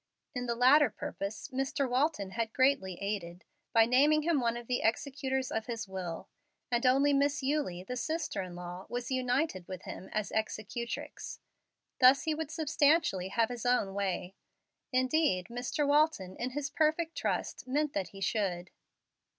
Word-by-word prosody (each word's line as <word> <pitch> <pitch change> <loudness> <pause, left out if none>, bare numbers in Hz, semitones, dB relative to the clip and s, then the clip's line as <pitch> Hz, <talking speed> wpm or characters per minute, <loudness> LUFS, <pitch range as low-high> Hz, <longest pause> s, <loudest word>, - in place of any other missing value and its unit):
In 250 -1 -3
the 235 - 0
latter 260 +3 +6
purpose 200 +2 -5
Mr. 270 +1 -1
Walton 250 -6 0
had 225 +2 -2
greatly 260 -10 +2
aided 190 -4 -4 0.3
by 225 -1 +6
naming 290 +6 +4
him 330 -2 +2
one 235 0 0
of 240 - -8
the 245 +1 -1
executors 265 +2 -1
of 220 0 -2
his 230 -4 -4
will; 185 -3 -5 0.4
and 240 +1 +2
only 275 +3 +4
Miss 285 0 +2
Eulie, 265 -11 -1
the 250 +6 -5
sister 310 0 -2
in 180 -2 -7
law, 180 +1 -7
was 245 +1 -4
united 250 - 0
with 185 -1 -7
him 190 - -8
as 215 -1 -2
executrix. 220 +2 -4 0.6
Thus 260 +2 +7
he 315 - 0
would 310 -1 -4
substantially 305 - +2
have 225 +3 +1
his 245 -2 -5
own 245 -6 +2
way. 190 -2 -2 0.6
Indeed, 255 - +2
Mr. 250 +4 -1
Walton, 290 -11 +2
in 245 - -3
his 280 +1 -4
perfect 315 +1 +1
trust, - - -2
meant 295 +3 0
that 195 -2 -1
he 195 - -12
should. 190 -4 -1
245 Hz, 160 wpm, -31 LUFS, 200-285 Hz, 0.6 s, Thus